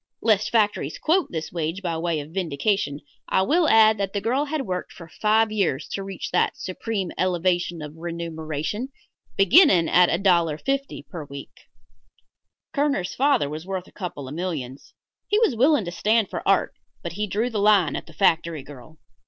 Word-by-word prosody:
Lest 215 -2 +2
factories 205 -10 +1
quote 350 +3 +1
this 160 -1 -4
wage 165 +3 -3
by 170 -2 -1
way 165 -1 -1
of 145 +2 -8
vindication, 170 -2 -1 0.3
I 190 - +3
will 320 - +2
add 220 -1 +5
that 195 -1 -2
the 205 - 0
girl 255 +8 0
had 300 -1 -2
worked 180 -2 -4
for 170 - -12
five 215 +5 +2
years 170 -10 0
to 195 - -4
reach 195 -2 -6
that 180 - +1
supreme 190 0 -4
elevation 175 -2 0
of 150 +1 -9
remuneration, 165 - -4 0.5
beginning 195 - +6
at 180 0 +5
$1.50 180 - 0
per 165 -6 -7
week. 140 -1 -11 1.1
Kerner's 280 - 0
father 275 - +2
was 155 +4 -7
worth 190 -2 -4
a - - -17
couple 170 -8 -6
of 135 - -7
millions 150 -7 -5 0.3
He 415 - +2
was 440 - +3
willing 265 -1 +3
to 175 - -4
stand 210 +4 +1
for - - -3
art, 195 0 +2 0.3
but 170 - -4
he 210 +3 -2
drew 220 +5 -1
the 215 - -2
line 200 -7 +4
at - - -6
the - - -14
factory 165 -5 +1
girl. 145 +3 -13
185 Hz, 175 wpm, -24 LUFS, 165-215 Hz, 1.1 s, beginning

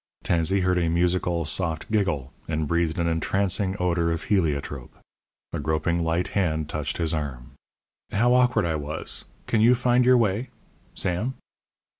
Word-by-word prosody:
Tansey 85 +3 +2
heard 90 -1 +2
a 85 -1 +1
musical, 85 0 +1
soft 80 +3 -2
giggle, 90 - 0
and 80 -1 -1
breathed 85 0 0
an 85 - 0
entrancing 95 +4 0
odour 85 -2 +1
of 85 - -2
heliotrope. 75 - -1 0.6
A - - -2
groping 80 +3 0
light 80 +2 0
hand 80 -6 0
touched 75 -2 -3
his 85 -2 0
arm. 70 -6 -4 0.6
"How 120 +4 +3
awkward 125 -5 +3
I 80 -2 0
was! 75 +1 -5 0.2
Can 110 - +1
you 120 +3 +6
find 125 0 +3
your 125 0 +6
way 115 +2 0 0.5
Sam?" 105 +9 -1
85 Hz, 150 wpm, -25 LUFS, 80-100 Hz, 0.6 s, you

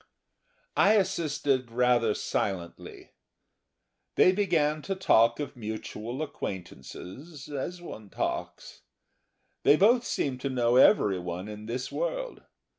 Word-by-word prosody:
I 205 - +5
assisted 155 - 0
rather 120 -2 +2
silently. 90 -4 -4 1.0
They 185 - +6
began 165 -6 +1
to 195 +5 -3
talk 115 -11 +3
of 145 -1 -5
mutual 110 +3 -5
acquaintances 95 - -8
as 160 +5 -5
one 110 - -9
talks. - - -4 0.8
They 145 - +6
both 230 +8 +4
seemed 130 - -2
to 140 - -2
know 120 -1 +2
everyone 95 - +3
in 105 0 -8
this 125 +3 -4
world. - - -3
130 Hz, 110 wpm, -28 LUFS, 110-170 Hz, 1.0 s, They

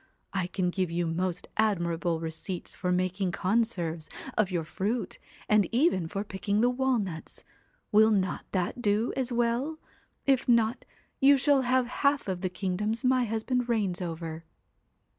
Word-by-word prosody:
I 190 -2 0
can 180 -1 -1
give 185 -1 -1
you 170 +1 -1
most 175 +2 -2
admirable 170 -5 +1
receipts 165 +3 -5
for 180 -1 -2
making 185 +1 0
conserves 180 -7 0 0.3
of 215 -3 +2
your 175 -3 -1
fruit, 205 +9 -3 0.3
and 210 -3 +3
even 235 - +2
for 195 +4 -3
pickling 200 +1 -1
the 245 +1 +4
walnuts. 240 -10 -2 0.5
Will 215 +1 +6
not 190 -4 0
that 190 +6 -1
do 210 +1 +1
as 260 -2 -1
well? 240 +6 0 0.5
If 270 -2 +2
not, 235 0 +3 0.3
you 280 +1 +6
shall 280 +1 +4
have 255 0 +2 0.2
half 280 -3 +2
of 185 -2 -2
the 185 - -1
kingdoms 205 +5 -2
my 255 -1 +3
husband 235 +3 -1
reigns 200 -6 0
over." 165 -1 -5
205 Hz, 150 wpm, -28 LUFS, 180-240 Hz, 0.5 s, Will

